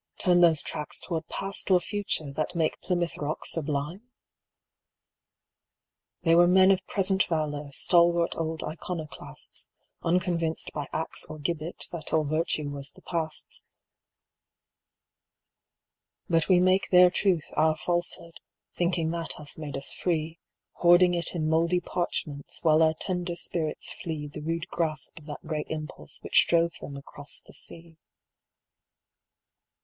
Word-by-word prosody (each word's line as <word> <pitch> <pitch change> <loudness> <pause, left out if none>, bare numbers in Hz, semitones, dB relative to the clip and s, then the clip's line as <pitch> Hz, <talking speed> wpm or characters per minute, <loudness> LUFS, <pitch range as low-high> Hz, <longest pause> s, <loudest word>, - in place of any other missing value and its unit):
Turn 175 -1 +4
those 165 -3 +5
tracks 150 - -4
toward 165 -2 -4
Past 195 +1 -3
or 185 -1 +6
Future, 180 -6 -2
that 155 +5 -3
make 160 -2 0
Plymouth 175 -2 -1
Rock 150 +1 -3
sublime? 150 +3 -2 2.2
They 165 - +4
were 175 +1 +7
men 190 +1 +6
of 190 -1 +2
present 195 -1 +2
valor, 150 -3 -2
stalwart 170 +2 +3
old 160 -1 -3
iconoclasts, 160 -3 -6 0.3
Unconvinced 170 -2 0
by 145 - -4
axe 160 - -1
or 155 - -7
gibbet 155 +3 -3
that 165 -3 -6
all 160 -1 +4
virtue 155 0 0
was 140 -1 -2
the - - -12
Past's; 160 -3 -3 2.6
But 165 -2 +2
we 180 -2 +6
make 185 +1 +3
their 180 -1 +7
truth 180 -4 +1
our 155 0 +3
falsehood, 175 0 -2 0.3
thinking 170 -2 0
that 170 -1 -2
hath 150 -1 -11
made 150 -3 -5
us 135 - -1
free, 165 -1 -1 0.4
Hoarding 175 +1 +6
it 170 +1 -1
in 155 -2 0
mouldy 165 +3 +3
parchments, 155 -5 -3
while 155 -1 +5
our 160 0 +4
tender 180 0 -2
spirits 165 -2 -1
flee 160 -4 -5
The 150 +1 -8
rude 165 +2 -2
grasp 155 -2 -2
of 150 - -17
that 150 +1 -8
great 155 -1 -3
Impulse 150 - -6
which - - +4
drove 170 0 +3
them 140 - -7
across 145 +1 -3
the - - -15
sea. 165 -1 -6
165 Hz, 135 wpm, -28 LUFS, 155-175 Hz, 2.6 s, were